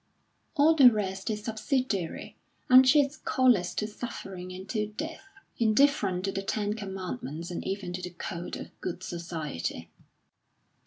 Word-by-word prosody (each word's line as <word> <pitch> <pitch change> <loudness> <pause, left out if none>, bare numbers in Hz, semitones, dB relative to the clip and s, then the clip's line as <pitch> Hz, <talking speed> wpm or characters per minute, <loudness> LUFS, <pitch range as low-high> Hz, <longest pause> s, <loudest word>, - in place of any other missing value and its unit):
All 305 +2 +6
the 270 -6 +8
rest 195 -1 -2
is 210 -1 -3
subsidiary, 220 - -2 0.3
and 255 +1 +9
she 295 +2 +7
is 285 +2 -3
callous 240 -13 +2
to 210 - 0
suffering 195 -4 -7
and 185 +1 -8
to 215 -3 -1
death, 310 - -6 0.4
indifferent 215 -5 +3
to 195 - 0
the 195 - -3
Ten 205 +1 -1
Commandments 185 - -5
and 175 - -4
even 190 -2 -3
to 180 - -4
the 180 - -4
code 175 0 -6
of - - -11
Good 180 +1 -4
Society. 155 - -5
200 Hz, 150 wpm, -29 LUFS, 180-245 Hz, 0.4 s, and